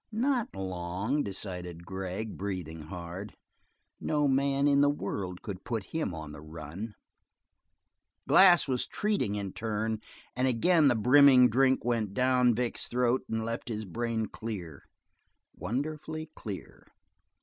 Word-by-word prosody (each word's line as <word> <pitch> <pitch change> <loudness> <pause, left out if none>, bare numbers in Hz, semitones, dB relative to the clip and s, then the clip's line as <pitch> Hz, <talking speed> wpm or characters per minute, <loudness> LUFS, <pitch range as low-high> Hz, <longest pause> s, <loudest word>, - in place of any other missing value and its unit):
Not 245 - 0
long, 95 +7 -2
decided 90 -5 -6
Gregg, 95 +3 -4
breathing 90 -5 -4
hard; 90 +4 -7 0.6
no 150 -1 +1
man 140 +1 +2
in 140 -1 +4
the 145 - +5
world 100 -9 -4
could 95 -3 -6
put 115 -4 -2
him 160 - -1
on 80 -1 -7
the 75 - -10
run. 80 +7 -7 1.3
Glass 180 -4 +7
was 130 -2 -1
treating 205 - 0
in 100 -2 -4
turn, 110 0 -2 0.3
and 130 +1 +1
again 150 +6 +4
the 125 - +4
brimming 125 +2 +7
drink 130 +2 +3
went 110 -5 0
down 125 -1 +3
Vic's 120 0 -1
throat 125 +1 +1
and 110 0 -1
left 115 +2 -4
his 110 -1 -3
brain 115 +3 -2
clear, 95 -10 -7 0.7
wonderfully 155 - -4
clear. 100 -4 -8
110 Hz, 130 wpm, -30 LUFS, 95-135 Hz, 1.3 s, Glass